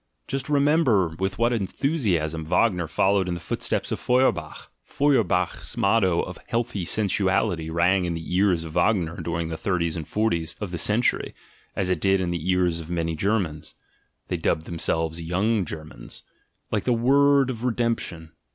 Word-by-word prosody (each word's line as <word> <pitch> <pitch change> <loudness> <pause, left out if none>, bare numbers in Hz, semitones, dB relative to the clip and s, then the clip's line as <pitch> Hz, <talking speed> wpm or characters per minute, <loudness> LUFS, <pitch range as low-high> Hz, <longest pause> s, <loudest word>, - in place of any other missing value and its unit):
Just 135 +1 -3
remember 140 - +3
with 95 0 -1
what 120 +2 +2
enthusiasm 95 - -1
Wagner 90 +1 +1
fol 95 +5 +2
lowed 95 -2 +1
in 90 - -1
the - - -5
footsteps 85 - -2
of - - -2
Feuerbach. 125 +1 0
Feuerbach's 110 - 0
motto 100 -4 +3
of 90 - -7
"healthy 115 -5 -2
sensuality" 95 -5 +1
rang 90 +3 +2
in 85 -1 -2
the 80 +2 -4
ears 90 -3 +3
of 80 - -7
Wagner 85 -1 +1
dur 85 0 -3
ing 80 - -4
the 80 - -4
thirties 85 -4 -1
and 80 -3 -5
forties 85 -7 -1
of 105 -4 -5
the 85 - -3
century, 105 +8 +1 0.4
as 95 -1 0
it 90 - -1
did 95 0 +3
in 90 -2 -1
the 85 +1 -3
ears 90 -2 +2
of 80 0 -9
many 85 -2 -1
Germans 85 -5 -1 0.5
(they - - -2
dubbed 80 - 0
themselves 80 0 -2
"Young 95 +5 0
Germans"), 75 -6 -8 0.5
like - - -1
the 125 - +3
word 135 +3 +4
of 115 -1 -7
redemption. 115 -9 -2
90 Hz, 170 wpm, -24 LUFS, 85-115 Hz, 0.5 s, word